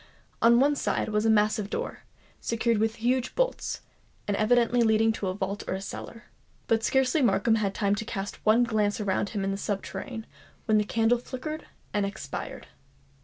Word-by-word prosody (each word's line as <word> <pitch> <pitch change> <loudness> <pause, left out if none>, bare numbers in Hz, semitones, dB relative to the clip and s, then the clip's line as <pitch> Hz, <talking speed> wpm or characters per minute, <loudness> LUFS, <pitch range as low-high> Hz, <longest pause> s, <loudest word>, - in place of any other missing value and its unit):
On 235 +1 +6
one 290 +2 +4
side 275 - -1
was 210 +1 +1
a - - +4
massive 210 -1 +2
door, - - -4 0.3
secured 230 -1 0
with 220 +1 +1
huge 245 +2 0
bolts, - - -1 0.5
and 205 - +1
evidently 240 +3 +3
leading 220 0 +4
into 220 -3 -1
a 185 - -2
vault 200 +1 -3
or 190 - -2
cellar. 230 +4 -8 0.4
But 225 -1 +2
scarcely 265 +5 +2
had 250 - +5
Markham 220 +2 +2 0.2
time 200 0 +1
to 210 +2 -2
cast 200 -2 -5
one 220 +3 +5
glance 215 -3 +1
around 200 -1 0
him 205 -3 -3
in 195 - 0
the 195 - -2
subterranean, 220 +4 -4 0.4
when 215 -2 +4
the 210 - 0
candle 225 +3 +2
flickered 265 +5 -6 0.3
and 205 - +1
expired. 200 -8 -5
220 Hz, 175 wpm, -27 LUFS, 205-235 Hz, 0.5 s, On